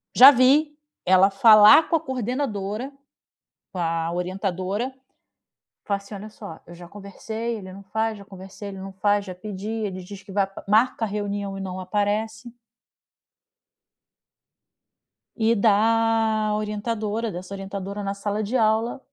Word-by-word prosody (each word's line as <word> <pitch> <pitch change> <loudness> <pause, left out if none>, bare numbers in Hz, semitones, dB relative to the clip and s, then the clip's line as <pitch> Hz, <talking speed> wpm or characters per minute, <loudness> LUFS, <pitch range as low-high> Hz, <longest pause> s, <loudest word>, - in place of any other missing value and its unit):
já 260 +2 +11
vi 290 +4 +3 0.3
ela 185 +1 +5
falar 215 +7 +7
com - - +2
a 325 - +3
coordenadora, 250 -4 -3 0.8
com 185 - -7
a 165 -1 -1
orientadora, 190 +5 -3 0.9
fala 200 - 0
assim: 200 +1 -13
"Olha 205 +2 -8
só, 165 -6 -10
eu 175 - -11
já 175 0 -12
conversei, 220 +4 -6
ele 190 -3 -10
não 195 +1 -11
faz, 220 +2 -2
já 200 - -13
conversei 195 +1 -10
ele 195 -1 -9
não 195 +1 -8
faz, 205 +1 +1
já 185 - -7
pedi 200 +2 -7
ele 210 -5 -4
diz 195 +1 -10
que 195 - -12
vai 195 -1 0 0.2
marca 225 +2 +2
a - - -4
reunião 200 -1 -4
e - - -6
não 185 -1 -5
aparece." 215 +4 -2 2.9
E 230 0 +2
da 220 0 +2
orientadora 215 +1 -3
dessa 185 +2 -8
orientadora 195 +1 -6
na 195 0 -2
sala 205 +1 -3
de 235 +6 -1
aula, 225 +3 +1
205 Hz, 145 wpm, -23 LUFS, 195-225 Hz, 2.9 s, já